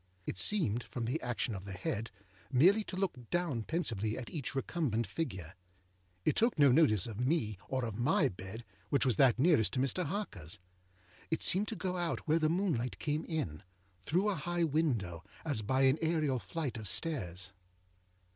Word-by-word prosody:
It 95 - -3
seemed, 125 - +3
from 120 -1 -5
the 120 - -1
action 120 -1 -2
of 95 -1 -6
the 100 - -6
head, 100 +5 -3 0.4
merely 185 - +5
to - - -6
look 175 -11 -3
down 175 -9 0
pensively 110 - -1
at 125 -2 -6
each 140 -4 -4
recumbent 135 -5 0
figure. 95 - -4 0.7
It - - +3
took 230 -2 +2
no 140 -3 +6
notice 125 - +4
of 110 -2 -6
me, 125 - 0
or 130 -2 0
of 110 -1 -5
my 140 +3 +3
bed, 95 +5 -8 0.2
which 140 - +2
was 125 -6 +2
that 130 -4 +5
nearest 130 - +4
to 130 - 0
Mr. 135 +7 +1
Harkerâs. 105 - -4 0.7
It 160 - -1
seemed 200 +4 +2
to 225 - -4
go 185 -3 -2
out 175 -2 -2
where 160 +2 +4
the 155 -1 +2
moonlight 165 -9 0
came 150 +1 -2
in, 145 - -3 0.4
through 180 - +1
a - - +1
high 175 +1 -1
window, 125 - 0 0.2
as 145 -8 0
by 130 +6 +1
an 135 +2 +5
aërial 155 -6 0
flight 130 - -4
of 110 -2 -2
stairs. 95 - 0
135 Hz, 180 wpm, -33 LUFS, 110-165 Hz, 0.7 s, no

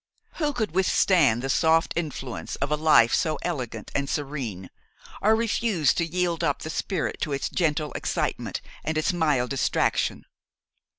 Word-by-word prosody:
Who 300 -3 +1
could 220 - -2
withstand 170 - +3
the - - -1
soft 160 +3 +3
influence 145 -7 -4
of 140 - -3
a - - +4
life 150 -7 +5
so 155 -2 +1
elegant 125 -10 -4
and 140 0 -1
serene, 130 -11 -4 0.5
or 215 +2 +4
refuse 220 - +1
to 170 - 0
yield 175 -1 0
up 145 -4 0
the 155 - -4
spirit 180 -1 -2
to 150 - -1
its 135 - -2
gentle 155 -3 0
excitement - - -2 0.2
and 160 0 -2
its 155 +5 +1
mild 150 -7 +1
distraction? 135 - 0
155 Hz, 155 wpm, -25 LUFS, 135-175 Hz, 0.5 s, life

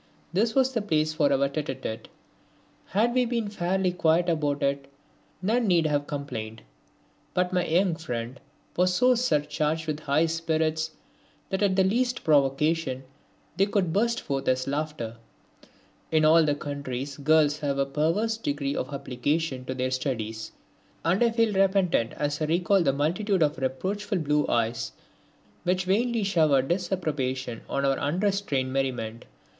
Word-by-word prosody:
This 220 +5 +1
was 265 -1 +3
the 230 - 0
place 155 -6 0
for 145 -2 +2
our 140 0 +3
tete 145 +2 -4
a 135 - -1
tete. 115 -4 -6 0.8
Had 225 +5 +1
we 255 0 +3
been 230 -3 -1
fairly 185 -1 0
quiet 175 0 +2
about 145 -3 0
it 140 0 -1 0.5
none 225 +4 +1
need 170 -4 +3
have 145 -1 0
complained, 110 -7 -5 0.7
but 180 0 +1
my 180 -1 +1
young 175 +1 +2
friend 125 -5 -5 0.4
was 180 +1 +3
so 250 +5 +5
surcharged 155 -8 0
with 155 -1 -3
high 150 +2 +2
spirits 160 -1 0 0.6
that 190 - -1
at 200 -2 +3
the 190 - +4
least 245 +6 0
provocation 145 -1 +2 0.5
they 195 +2 +3
would 190 -5 0
burst 235 +4 +1
forth 135 -1 -3
as 130 +1 +1
laughter. 140 -6 -3 0.9
In 155 -1 +3
all 155 -1 +5
countries 140 -2 -5
girls 150 0 +3
have 140 -2 -1
a 140 - +2
perverse 165 +11 0
degree 145 -7 -2
of 130 - -3
application 135 +1 -2
to 130 - -4
their 130 0 -1
studies, 115 -5 -3 0.5
and 180 +7 +3
I 235 - +4
feel 230 -2 +1
repentant 190 - +2
as 145 +1 -2
I - - +2
recall 175 +5 +2
the 140 - +3
multitude 175 +7 +1
of 150 -2 0
reproachful 190 +11 -2
blue 150 -2 +1
eyes 115 0 -1 0.7
which 180 +1 0
vainly 225 +4 +1
showered 155 -9 +2
disapprobation 150 -9 -2
on 140 0 0
our 135 0 +1
unrestrained 170 -5 0
merriment. 125 -4 -2
155 Hz, 150 wpm, -26 LUFS, 140-190 Hz, 0.9 s, so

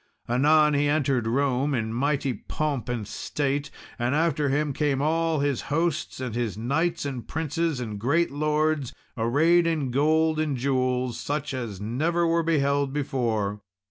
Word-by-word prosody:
Anon 150 +5 +4
he 145 0 +2
entered 135 -6 +1
Rome, 135 +3 +1
in 110 -2 -2
mighty 140 +1 0
pomp 140 +3 -3
and 115 -4 -3
state; 140 +2 -2 0.3
and 120 +3 +1
after 155 -2 +1
him 145 +1 0
came 145 -1 0
all 160 +1 +1
his 140 -3 0
hosts, 160 -1 -1
and 125 -3 -4
his 115 -4 -2
knights, 160 +9 0
and 130 -4 -5
princes, 160 -1 -1
and 110 -4 -5
great 145 +10 +1
lords, 150 -1 0 0.2
arrayed 160 +9 +3
in 155 -6 -1
gold 155 +3 +2
and 150 -4 0
jewels, 130 -2 0
such 145 0 -3
as 115 -7 -4
never 155 +11 0
were 165 0 +2
beheld 140 -4 +1
before. 115 -8 -1
140 Hz, 150 wpm, -26 LUFS, 125-155 Hz, 0.3 s, Anon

